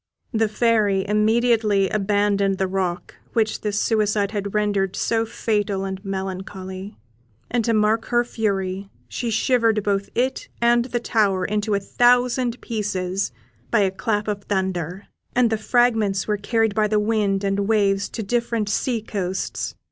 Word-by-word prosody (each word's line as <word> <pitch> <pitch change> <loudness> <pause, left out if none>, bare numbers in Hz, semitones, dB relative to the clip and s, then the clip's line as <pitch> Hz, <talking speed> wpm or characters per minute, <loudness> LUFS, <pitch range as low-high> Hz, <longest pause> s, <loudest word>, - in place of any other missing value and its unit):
The 220 0 +2
Fairy 210 -3 +2
immediately 215 -1 +3
abandoned 200 -1 +1
the 190 - +1
rock 185 -2 -2 0.2
which 220 -2 0
this 205 -1 -1
suicide 210 -2 +1
had 205 -1 -4
rendered 200 -2 +1
so 225 -1 0
fatal 205 -3 -1
and 190 0 -5
melancholy; 190 0 -5 0.5
and 240 -1 +1
to 230 - +2
mark 215 +1 +2
her 240 0 +2
fury, 195 -4 -2 0.2
she 240 - -3
shivered 225 -1 +2
both 200 -1 0
it 255 +2 -1
and 235 0 +3
the 240 -1 -2
tower 200 -5 +1
into 210 +1 0
a - - +1
thousand 245 +3 +2
pieces 195 - -2 0.4
by 220 - +3
a 195 -1 +2
clap 210 +1 -1
of 205 -1 -3
thunder, 190 -2 -2 0.3
and 245 -2 +3
the 220 - +1
fragments 220 -4 +2
were 210 - +1
carried 225 +1 +1
by 215 +1 +2
the 210 0 +2
wind 210 -2 +1
and 200 0 0
waves 200 -2 +2
to 225 - -5
different 230 -1 -1
sea 230 +1 -1
coasts. 190 -3 -3
210 Hz, 150 wpm, -22 LUFS, 195-225 Hz, 0.5 s, immediately